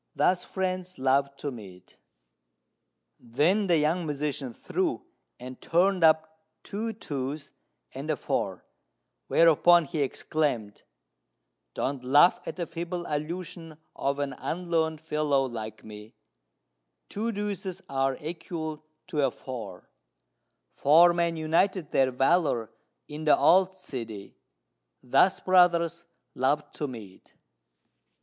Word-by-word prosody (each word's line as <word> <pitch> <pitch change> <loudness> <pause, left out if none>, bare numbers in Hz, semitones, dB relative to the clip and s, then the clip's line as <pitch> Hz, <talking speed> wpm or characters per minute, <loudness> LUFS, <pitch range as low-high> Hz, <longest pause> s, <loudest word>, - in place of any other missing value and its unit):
Thus 180 0 +2
friends 185 -1 -3
love 135 +1 +1
to 145 0 -5
meet!" 95 -7 -12 1.2
Then 155 - +1
the 170 -2 +4
young 160 +3 0
musician 145 -3 -3
threw, 365 - -2 0.3
and 125 +1 -9
turned 180 +1 +2
up 160 0 +3 0.2
two 220 +3 -4
twos 140 -6 -5 0.4
and - - -7
a - - +2
four; - - -3 0.6
whereupon 170 +1 +5
he 145 +2 -3
exclaimed, 135 -6 -2 0.9
"Don't 135 -1 -2
laugh 145 +7 +5
at - - -4
the 175 - -3
feeble 175 +1 -5
allusion 165 +1 -5 0.2
of 140 +1 -1
an 140 -1 -2
unlearned 165 -2 -1
fellow 150 -3 +1
like 110 -3 -7
me: 105 0 -12 0.9
'Two 225 +3 -2
deuces 200 -3 -4
are 135 -1 0
equal 160 -1 -5 0.2
to 155 -5 -1
a 135 - +3
four: 115 -8 -8 0.9
Four 170 +5 +6
men 170 -1 0
united 165 +2 +1
their 135 -1 +3
valour 135 -3 +1 0.4
in 150 +1 -7
the 150 - +5
old 190 +1 +4
city. 115 - -8 0.7
Thus 180 +9 +3
brothers 170 -2 +3 0.3
love 145 +3 0
to 150 - -4
meet! 110 -7 -11
155 Hz, 115 wpm, -27 LUFS, 135-175 Hz, 1.2 s, Four